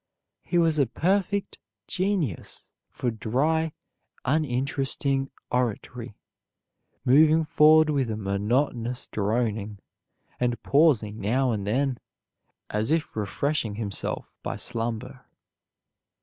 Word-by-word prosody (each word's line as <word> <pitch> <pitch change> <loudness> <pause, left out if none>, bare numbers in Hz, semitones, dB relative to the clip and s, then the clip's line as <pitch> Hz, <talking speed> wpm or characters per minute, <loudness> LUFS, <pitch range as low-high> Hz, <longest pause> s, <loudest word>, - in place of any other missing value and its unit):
He 175 - -1
was 165 -3 +3
a 140 - +4
perfect 195 - 0 0.3
genius 185 - -2 0.2
for 120 - -2
dry 150 +9 0 0.5
uninteresting 135 -1 0 0.2
oratory, 120 -1 -2 0.9
moving 155 +5 +6
forward 155 0 +5
with 135 -5 0
a 110 - -2
monotonous 115 +5 -1
droning, 105 -1 -1 0.6
and 120 -2 -1
pausing 125 -8 +3
now 125 +5 +1
and 100 -3 -3
then 130 +3 0 0.7
as 105 +3 0
if 160 -1 0
refreshing 110 +2 -1
himself 105 -3 -3
by - - -3
slumber. 120 +2 -4
125 Hz, 95 wpm, -26 LUFS, 110-150 Hz, 0.9 s, moving